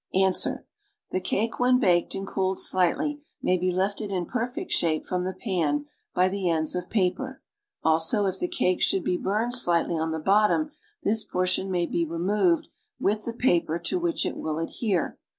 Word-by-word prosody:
^ - - +4
Ans. 190 -1 +3 0.6
The 185 - -1
cake 220 +5 -1
when 250 +1 +5
baked 180 -8 +2
and 195 - -4
cooled 190 -1 -1
sliglitl_\' 290 - +1 0.2
may 185 0 +2
lie 185 +1 +1
lifted 205 +1 -3
in 180 -2 -1
perfect 250 - -3
shape 160 -2 +1
from 180 0 -1
the 185 - -1
pan 160 -9 -1 0.3
))y 180 +1 +4
the 190 -1 -1
ends 160 -2 +1
of 180 0 -4
paper, 225 +7 -1 0.4
also 160 +6 +2
if 190 - -2
the 355 - 0
cake 335 - 0
should 190 - +2
be 180 - +1
burned 215 +7 -1
slightly 175 -8 +2
on 160 +1 -1
the 160 - -2
bottom 210 - +3 0.3
this 220 +1 +2
portion 185 +1 0
may 175 -2 +1
be 170 - 0
removed 175 +2 +1 0.3
with 210 +2 0
the 235 - -2
paper 175 -9 +2
to 265 - -2
which 345 -1 0
it - - -2
will 155 -1 -3
adhere. 180 +3 -1
185 Hz, 185 wpm, -26 LUFS, 175-220 Hz, 0.6 s, when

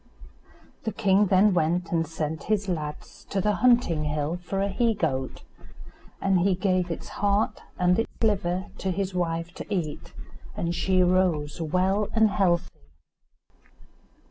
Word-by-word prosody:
The 220 - -3
king 200 -1 +3
then 195 +2 +4
went 170 +1 0
and 165 -2 +1
sent 155 -1 -4
his 205 -2 0
lads 155 -5 -5
to 200 - -1
the 210 +2 +1
hunting 230 -9 +3
hill 150 +2 -1
for 195 +2 -3
a - - +1
he 225 +3 +1
goat, 135 -9 -2 0.8
and 195 -2 +2
he 185 +1 +2
gave 185 -1 0
its 165 - -5
heart 205 +1 +1 0.2
and 180 +2 +3
its 225 - -1
liver 190 -4 0
to 190 - -2
his 190 0 -2
wife 170 -1 -2
to - - -9
eat; 160 -6 -3 0.5
and 170 0 -1
she 185 +1 +2
rose 175 -4 +1
well 185 +6 +1
and 220 -2 +4
healthy. 180 -3 +1
180 Hz, 145 wpm, -26 LUFS, 165-200 Hz, 0.8 s, then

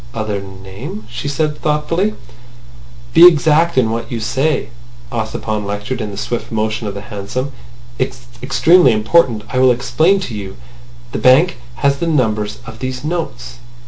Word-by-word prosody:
"Other 110 -3 -2
name?" 95 +2 -9
she 120 +3 -5
said 150 +1 -1
thoughtfully. 165 +7 0 1.0
"Be 175 - +10
exact 160 0 +3
in 115 -4 +3
what 115 0 -4
you 120 - -2
say," 135 +6 0 0.4
Ossipon 110 -2 -3
lectured 105 +5 -4
in 105 - -3
the 100 - -8
swift 120 +3 -4
motion 110 0 -1
of 100 - -5
the 100 - -5
hansom. 115 +5 -5 0.5
"It's 130 -1 -3 0.2
extremely 135 +2 +5
important. 110 0 +2
I 130 - -1
will 130 0 +6
explain 125 +10 +2
to 130 - -5
you. 100 -2 -7 0.5
The - - -3
bank 150 +8 +5 0.2
has 140 +3 +1
the 170 - -2
numbers 110 -8 0
of 110 0 -10
these 130 0 -4
notes. 125 -7 -4
120 Hz, 155 wpm, -17 LUFS, 110-150 Hz, 1.0 s, Be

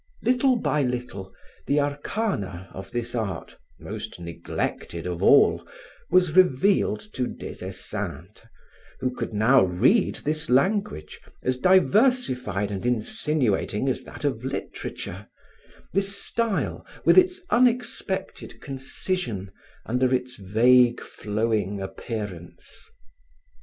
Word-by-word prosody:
Little 255 +2 +3
by 150 -10 0
little, 125 -7 -3 0.4
the 145 - +3
arcana 145 - -2
of 95 +1 -8
this 120 +2 -3
art, 110 -5 -4 0.2
most - - -7
neglected 85 0 -4
of 90 -1 -4
all, - - +5 0.5
was 180 -3 +3
revealed 180 - +4
to 125 -1 -1
Des - - -8
Esseintes 90 +10 -6 0.6
who 130 -1 -1
could 125 - -5
now 110 +5 +5
read 110 - +3
this 155 +1 -3
language, 140 - +1 0.2
as 130 0 0
diversified 185 - +3
and 95 -2 -4
insinuating 125 - 0
as 130 - -1
that - - -8
of 130 -5 -1
literature, 130 - -6 0.7
this 195 +1 +1
style 230 -3 -1 0.2
with - - +6
its 370 0 +5
unexpected 240 -5 0
concision 135 - -4 0.3
under 125 +2 +1
its 125 0 -1
vague 120 +5 +4
flowing 105 -2 -2
appearance. 95 -2 -7
125 Hz, 105 wpm, -25 LUFS, -, 0.7 s, with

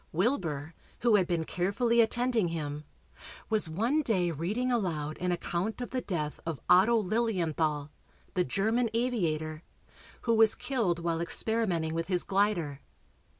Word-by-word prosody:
Wilbur, 165 - -1 0.3
who 235 -2 +4
had 190 -4 +4
been 170 -2 0
carefully 205 +8 +1
attending 235 -3 +1
him, 150 -3 -4 0.7
was 215 -6 +2
one 230 - +1
day 185 - +1
reading 205 - -1
aloud 160 -10 -1
an 180 0 0
account 175 +5 -2
of 245 - -5
the 255 0 -1
death 155 -8 -3
of 165 -4 -4
Otto 195 +6 +6
Lilienthal, 170 -9 0 0.4
the 180 - +2
German 225 +6 +1
aviator, 160 -11 -1 0.6
who 230 - +1
was 220 -1 +5
killed 235 -9 0
while 170 -1 -1
experimenting 175 -4 0
with 165 0 -2
his 180 -2 +1
glider. 190 -8 0
185 Hz, 140 wpm, -30 LUFS, 165-230 Hz, 0.7 s, Otto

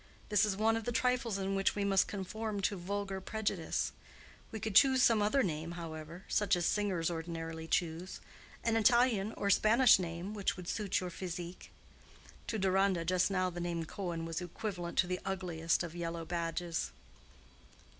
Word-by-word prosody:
This 210 0 +4
is 200 -2 -1
one 220 +1 +3
of 225 -1 -3
the 240 - -1
trifles 240 -2 +1
in 195 0 -2
which 195 0 +1
we 205 -1 0
must 195 -1 +3
conform 210 +2 -4
to 200 - +1
vulgar 195 +1 -3
prejudice. 205 -5 -2 0.6
We 220 - -5
could 220 0 -3
choose 260 +4 +6
some 225 -2 +5
other 235 +6 +3
name, 165 -1 -3
however—such 170 +4 -2
as 175 -1 -1
singers 185 -5 +1
ordinarily 165 -1 -5
choose—an 180 +7 -3
Italian 225 -2 +4
or 200 - 0
Spanish 225 +3 +6
name, 175 +3 -4
which 200 -3 -1
would 180 -1 -8
suit 210 -2 -1
your 180 -1 -4
physique." 175 0 -6 0.8
To 220 - -1
Deronda 190 -2 +2
just 185 +2 +2
now 185 -2 0
the 175 - -6
name 170 -1 -2
Cohen 170 -2 -4
was 165 +1 -3
equivalent 175 0 -5
to - - +5
the 180 0 -2
ugliest 175 -4 -1
of 170 -1 -6
yellow 170 -1 -4
badges. 170 0 -2
185 Hz, 165 wpm, -33 LUFS, 170-210 Hz, 0.8 s, choose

